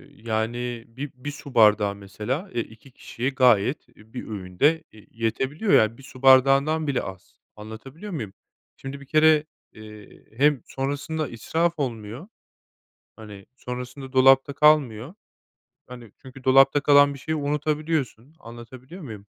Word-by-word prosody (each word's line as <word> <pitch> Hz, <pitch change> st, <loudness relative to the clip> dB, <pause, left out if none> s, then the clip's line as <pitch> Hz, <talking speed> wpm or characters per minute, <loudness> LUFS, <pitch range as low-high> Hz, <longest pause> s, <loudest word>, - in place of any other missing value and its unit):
yani, 115 Hz, +2 st, -4 dB
bi 135 Hz, +5 st, -8 dB
bir 130 Hz, +3 st, -7 dB
su 145 Hz, -1 st, -12 dB
bardağı, 105 Hz, -2 st, +4 dB
mesela, 105 Hz, -, -5 dB
eee, 120 Hz, -, -1 dB
2 110 Hz, +4 st, -13 dB
kişiye 125 Hz, +1 st, -5 dB
gayet, 125 Hz, -1 st, +2 dB
e, 110 Hz, -2 st, -22 dB
bir 125 Hz, -, -7 dB
öğünde 110 Hz, -, 0 dB
ye 110 Hz, -1 st, -18 dB
yetebiliyor, 135 Hz, -, -2 dB
yani, 110 Hz, +1 st, +4 dB
1 135 Hz, -, -15 dB
su 130 Hz, -1 st, -14 dB
bardağından 135 Hz, +4 st, +4 dB
bile 140 Hz, -3 st, 0 dB
az, 95 Hz, 0 st, -11 dB, 0.2 s
anlatabiliyor 130 Hz, -, -10 dB
muyum? 110 Hz, -, -6 dB, 0.4 s
Şimdi, 135 Hz, +1 st, -8 dB
bir -, -, -12 dB
kere, 155 Hz, +1 st, +4 dB, 0.3 s
eee, 105 Hz, -1 st, -14 dB
hem 145 Hz, -1 st, +3 dB
sonrasında 145 Hz, +3 st, -4 dB
israf 160 Hz, +9 st, -1 dB
olmuyor, 120 Hz, -, -5 dB, 0.9 s
hani, 105 Hz, -3 st, -12 dB
sonrasında 125 Hz, +2 st, -8 dB
dolapta 135 Hz, +1 st, +5 dB
kalmıyor. 145 Hz, -3 st, +2 dB, 0.7 s
Hani, 120 Hz, -4 st, -12 dB
çünkü 130 Hz, 0 st, -13 dB
dolapta 135 Hz, +2 st, +5 dB
kalan 145 Hz, 0 st, +5 dB
bir 140 Hz, -, -11 dB
şeyi 160 Hz, +4 st, -3 dB
unutabiliyorsun, 150 Hz, -2 st, -2 dB
anlatabiliyor 125 Hz, +8 st, -12 dB
muyum? 110 Hz, -, -9 dB
130 Hz, 135 wpm, -24 LUFS, 110-145 Hz, 0.9 s, dolapta